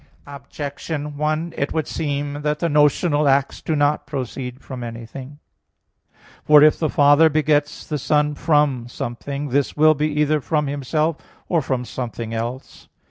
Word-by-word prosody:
Objection 145 +1 -6
1: 155 +3 -1
It 140 - -2
would 160 -2 -1
seem 145 -1 -3
that 150 0 0
the 170 - -1
notional 150 0 +3
acts 135 0 +1
do 160 - -1
not 145 0 +1
proceed 130 -2 -5
from 130 -3 -8
anything. 120 +4 -8 1.1
For 150 -1 +7
if 155 - +5
the 155 - 0
Father 145 +3 +5
begets 150 -1 0
the 150 -2 -3
Son 150 +2 +1
from 145 -5 +1
something, 140 +3 -5
this 140 +3 0
will 155 +1 +6
be 150 +1 0
either 150 0 +2
from 150 +1 0
Himself 150 +3 -1 0.3
or 170 -3 +1
from 130 -2 -2
something 115 -1 -5
else. 120 +4 -6
145 Hz, 150 wpm, -21 LUFS, 135-150 Hz, 1.1 s, For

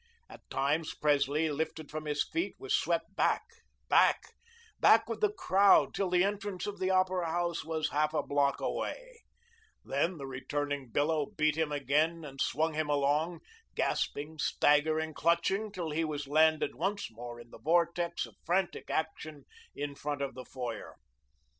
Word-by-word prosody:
At - - -12
times, 145 +4 0
Presley, 150 +1 +2
lifted 155 0 -4
from 155 0 -5
his 150 -1 0
feet, 335 +2 -2
was - - 0
swept - - -1
back, - - +2 0.4
back, - - +4 0.5
back, - - +6
with - - -4
the 425 -1 +3
crowd, 200 - +4
till 195 -2 -1
the 180 0 +3
entrance 200 -1 -2
of 205 -1 -5
the 185 - 0
Opera 185 -2 +2
House 170 0 -1
was 160 -1 -2
half 150 +1 +1
a - - +1
block 140 -1 +1
away; - - -4 0.6
then, 165 +6 0
the 140 - -6
returning 140 +1 -3
billow 150 +3 +1
beat 155 0 0
back 160 -1 +2 0.2
again 155 +4 +1
and 135 -2 -7
swung 160 +2 +1
him 155 -1 -1
along, 150 +4 +1 0.3
gasping, 150 +2 -1
staggering, 155 +2 +2
clutching, 170 +7 +1
till 175 -5 -4
he 160 +2 0
was 145 -2 -3
landed 155 +2 +3
once 200 - -2
more 120 +1 -8
in 120 0 -14
the - - -12
vortex 170 +4 +1
of - - -15
frantic 185 +1 -1
action 155 -2 -3 0.3
in 145 0 -4
front 145 0 -3
of 135 - -3
the 130 +1 -9
foyer. 125 -3 -6
155 Hz, 160 wpm, -31 LUFS, 145-175 Hz, 0.6 s, back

